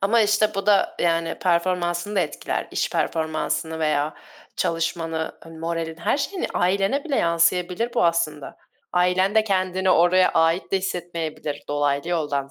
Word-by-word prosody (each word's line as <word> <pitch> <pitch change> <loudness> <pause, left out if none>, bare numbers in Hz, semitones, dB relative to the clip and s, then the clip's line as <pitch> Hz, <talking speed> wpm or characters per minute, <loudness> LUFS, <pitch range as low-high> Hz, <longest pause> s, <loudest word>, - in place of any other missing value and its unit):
ama 220 +4 +3
işte 215 0 +2
bu 195 0 -3
da 205 -2 +3
yani 165 -1 0
performansını 175 +2 0
da 190 - +4
etkiler, 155 - -3
iş - - -1
performansını 160 0 -1
veya 155 -1 0 0.4
çalışmanı, 165 -1 -2
eee, - - -11
moralin 165 0 -4
her 170 - 0
şeyini 355 +6 -2
ailene 195 +9 +1
bile 285 -5 -1
yansıyabilir 180 +6 +1
bu - - +3
aslında. 160 -4 -1 0.4
Ailen 180 +3 +2
de 220 - +4
kendini 185 -2 0
oraya 180 +2 +5
ait 165 +4 +1
de 195 - +3
hissetmeyebilir, 165 -5 -4
dolaylı 145 +1 0
yoldan 145 -5 -1
175 Hz, 145 wpm, -23 LUFS, 160-190 Hz, 0.4 s, oraya